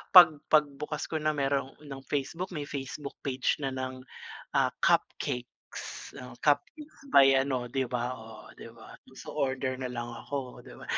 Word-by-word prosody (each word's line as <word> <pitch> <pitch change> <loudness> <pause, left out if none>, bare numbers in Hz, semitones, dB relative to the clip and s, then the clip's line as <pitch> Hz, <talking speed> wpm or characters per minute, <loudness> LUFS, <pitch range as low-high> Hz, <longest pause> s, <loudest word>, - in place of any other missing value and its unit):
'pag 165 -5 +10
pagbukas 150 0 +2
ko 160 - 0
na, 155 0 +1
meron 135 -1 0
ng 135 -2 -7
Facebook, 160 +6 -2
may 145 - -2
Facebook 140 +1 -5
page 135 +1 0
na 135 -2 -1
ng, 130 0 -4 0.5
ah, - - +2
cupcakes, 125 0 -1
o 125 -1 -9
cupcakes 295 - 0 0.2
by 135 -1 +9
ano, 130 -3 -1
'di 135 -1 0
ba? 125 +1 -1
Oh, 110 -1 -11
'di - - -9
ba? - - -13 0.2
So, - - -8
order 130 -1 -1
na 130 - -2
lang 120 -1 -4
ako, 130 +1 -5
'di - - -10
ba? - - -11
135 Hz, 165 wpm, -30 LUFS, 130-145 Hz, 0.5 s, pag